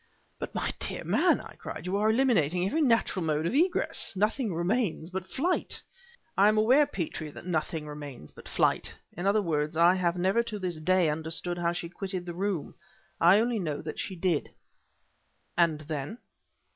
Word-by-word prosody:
"But, - - -6
my - - 0
dear - - -4
man!" - - +3
I - - -10
cried, - - -7
"you 185 +2 -1
are 210 +1 +2
eliminating 190 - +2
every 310 +12 0
natural 230 - +2
mode 155 0 0
of 170 - 0
egress! 345 +6 +1
Nothing 215 +3 +1
remains 175 0 -1
but 190 0 -4
flight." 340 - 0 0.6
"I 200 +2 +5
am 215 0 +3
aware, 255 +7 +5
Petrie, 155 -3 -4
that 150 - -11
nothing 160 -2 -2
remains 145 - -8
but - - -13
flight; - - +1 0.2
in 175 +4 -2
other 205 +1 +3
words 155 -2 -1
I 170 +2 +6
have 180 -2 0
never 190 +6 +2
to 230 -2 -5
this 180 -5 -3
day 185 +1 +3
understood 160 +3 -2
how 170 0 +1
she 175 -1 -4
quitted 185 0 -5
the 175 - -5
room. 185 -3 -2 0.5
I 180 +5 +6
only 235 0 +1
know 155 -6 -2
that 155 -1 -6
she 190 - -3
did." 170 -3 0 1.1
"And 165 -3 +2
then?" 150 - -5
180 Hz, 180 wpm, -29 LUFS, 160-210 Hz, 1.1 s, I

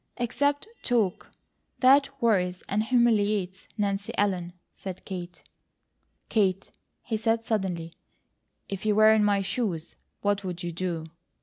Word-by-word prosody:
"Except 285 - 0
TALK, 225 -7 0 0.5
that 275 +2 +6
worries 185 -6 +1
and 205 +2 +1
humiliates 210 -5 +2
Nancy 200 +1 -1
Ellen," 185 -4 0 0.2
said 190 -2 -8
Kate. 180 -2 -7 0.8
"Kate," 195 -3 +1 0.3
he 225 -2 -2
said 225 +1 +1
suddenly, 185 -7 -2 0.7
"if 195 -2 -5
you 215 -1 +2
were 215 +1 +7
in 215 -1 +4
my 200 -1 +2
shoes, 190 -7 -2 0.3
what 205 0 +1
would 180 -2 -5
you 175 - -3
do?" 170 -2 -3
205 Hz, 125 wpm, -27 LUFS, 185-225 Hz, 0.8 s, were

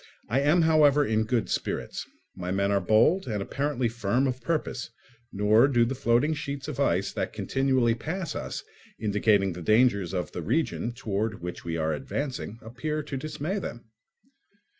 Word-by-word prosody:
I 125 +5 +2
am, 150 +5 +4
however, 150 -2 +5
in 110 -1 +1
good 115 0 0
spirits: - - -3 0.3
my 90 -1 -5
men 100 +1 +1
are 100 -1 +2
bold 115 - +3
and 105 -3 -2
apparently 135 +4 -1
firm 115 +3 0
of 130 -1 -2
purpose, 135 -3 -2 0.4
nor 105 +5 +4
do 120 -4 +3
the 125 - -2
floating 130 +3 +2
sheets 140 -2 -5
of 150 -3 -5
ice 95 -8 +1
that - - -3
continually 130 -3 +1
pass 160 +9 -4
us, - - -4 0.4
indicating 105 -2 +2
the 90 - -8
dangers 105 -2 +3
of 90 -2 -3
the - - -5
region 120 - -1
towards 110 -3 -2
which 90 0 -7
we 85 -1 -3
are 80 0 0
advancing, 135 -4 -4
appear 150 +7 -3
to 140 - -6
dismay 155 +7 -3
them. 120 - -8
120 Hz, 165 wpm, -27 LUFS, 105-140 Hz, 0.4 s, however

